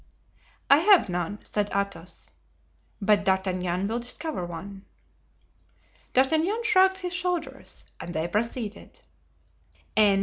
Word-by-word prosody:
"I 280 - +7
have 365 - +5
none," 180 +3 -2
said 205 -1 -1
Athos; 200 -3 -4 0.7
"but 205 -1 +3
D'Artagnan 185 -1 0
will 225 +4 -1
discover 250 - -4
one." 190 +3 -7 1.3
D'Artagnan 320 - +2
shrugged 380 -4 +4
his 365 -2 -4
shoulders 350 -1 -3
and 175 - -6
they 160 +2 0
proceeded. 220 +3 -3
210 Hz, 100 wpm, -26 LUFS, -, 1.3 s, I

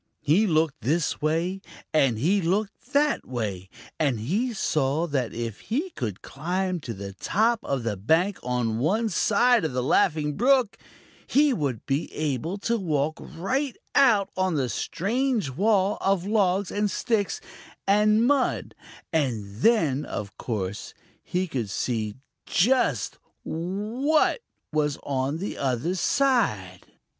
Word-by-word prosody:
He 185 +9 +4
looked 155 -3 +1
this 160 +5 0
way, 165 +5 0 0.3
and 135 -7 +3
he 185 - +2
looked 205 +8 -2
that 290 +1 +2
way, 100 -7 -4 0.3
and 140 -8 +1
he 200 - 0
saw 155 - 0
that 135 -7 -1
if 115 -2 -5
he 305 +11 -2
could 110 - -5
climb 180 +5 -2
to 120 -7 -6
the 100 0 -7
top 220 - +1
of 135 -3 -2
the 115 -3 -1
bank 165 - +1
on 120 -3 -1
one 210 - +1
side 225 +4 +3
of 155 - -1
the 125 0 0
Laughing 150 +3 +2
Brook, 255 -2 +3 0.5
he 290 0 +4
would 140 - -2
be 140 +2 -1
able 155 - -2
to 235 +1 0
walk 155 -4 -1
right 260 - -3 0.2
out 230 -8 +4
on 185 -2 +1
the 130 -4 0
strange 225 - -1
wall 200 - +2
of 195 -2 +1
logs 200 -2 +1
and 205 0 0
sticks 215 -2 -1 0.5
and 210 +3 +4
mud, 275 0 +1 0.4
and 110 -10 -1
then, 150 - +3
of 100 -1 -6
course, 105 -4 -4 0.3
he 180 +1 -1
could 125 - -3
see 110 0 -2 0.3
just 180 - +2 0.2
what 215 - 0 0.3
was 150 -2 +1
on 135 +2 -1
the 195 +5 -5
other 135 +6 0
side. 185 - +1
165 Hz, 135 wpm, -26 LUFS, 130-210 Hz, 0.5 s, He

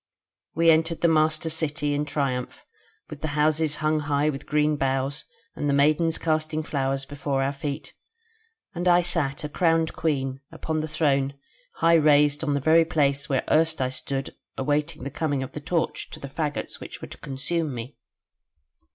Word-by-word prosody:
We 165 +1 +5
entered 165 +1 +1
the 170 - +4
master 155 0 +2
City 155 -2 -1
in 145 +1 0
triumph, 135 -4 -3 0.4
with 150 -1 -9
the 155 -1 -3
houses 155 0 +2
hung 155 0 +2 0.3
with 135 - -8
green 150 0 +2
boughs 135 0 -1 0.3
and 145 - -1
the 140 - +3
maidens 155 +3 +3
casting 155 -1 -1
flowers 135 -2 -1
before 140 -1 -2
our 135 +1 0
feet, 140 +1 -5 0.8
and 175 0 -2
I 175 0 +5
sat 165 -5 -1
a - - -2
crowned 165 +1 +1
Queen 135 -4 -1
upon 160 -1 -3
the 155 - -2
throne 140 -3 +1 0.4
high 165 - +3
raised 145 0 +4
on 145 -2 +1
the - - +1
very 160 +4 +5
place 145 -3 0
where 135 -2 +1
erst 160 0 +3
I 130 -1 +1
stood 135 +1 -4 0.2
awaiting 150 +3 -1
the 140 - -5
coming 145 -2 -1
of 130 - -7
the 150 - -7
torch 165 +2 -2
to - - -8
the 140 - -7
faggots 145 +1 -3
which - - -9
were - - -8
to - - -9
consume 150 +4 -2
me. 120 +4 -7
150 Hz, 175 wpm, -25 LUFS, 140-160 Hz, 0.8 s, We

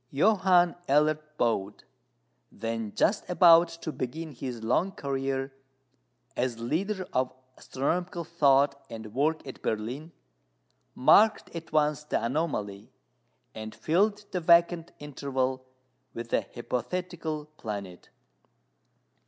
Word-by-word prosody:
Johann 180 +2 +4 0.2
Elert 150 +2 +3 0.2
Bode, 105 -4 -1 0.7
then 115 -1 -4
just 205 - +1
about 175 -1 +7 0.2
to 160 - -2
begin 155 +5 -5
his 125 -3 -6
long 170 +12 +1
career 135 -1 -3 0.8
as 125 -2 -1
leader 185 - -2
of 130 0 +1 0.2
astronomical 175 +6 -2
thought 140 -4 +3
and 110 -2 -8
work 155 +5 0
at 135 - -9
Berlin, 125 +9 -3 0.8
marked 215 +8 +4
at 165 -1 -7
once 150 -1 +2
the 135 -6 -1
anomaly, 115 -8 -2 0.6
and 110 0 -7
filled 205 +5 +1
the 180 - -1
vacant 170 0 +4
interval 130 -2 -3 0.5
with 115 0 -6
a - - +1
hypothetical 155 +5 -3
planet. 100 -5 -7
145 Hz, 105 wpm, -28 LUFS, 120-170 Hz, 0.8 s, about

